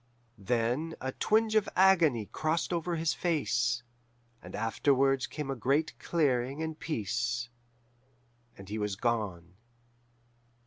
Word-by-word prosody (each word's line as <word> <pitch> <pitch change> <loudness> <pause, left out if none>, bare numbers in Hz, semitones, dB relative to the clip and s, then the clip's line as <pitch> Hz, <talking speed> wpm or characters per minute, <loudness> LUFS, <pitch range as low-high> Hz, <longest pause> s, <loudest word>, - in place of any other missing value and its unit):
Then 120 +9 0
a 130 - -3
twinge 220 +7 +2
of 215 -2 +3
agony 170 - +4
crossed 155 - -1
over 170 0 -1
his 160 -3 +1
face, 120 -7 0 0.6
and - - -9
afterwards 135 +5 +2
came 150 -3 -4
a - - -2
great 140 +6 +1
clearing 140 -2 0
and 160 -1 -5
peace, 120 -2 -2 1.1
and 100 - -11
he 105 +2 -4
was 105 -1 -1
gone. 100 -7 -2
135 Hz, 120 wpm, -30 LUFS, 115-160 Hz, 1.1 s, agony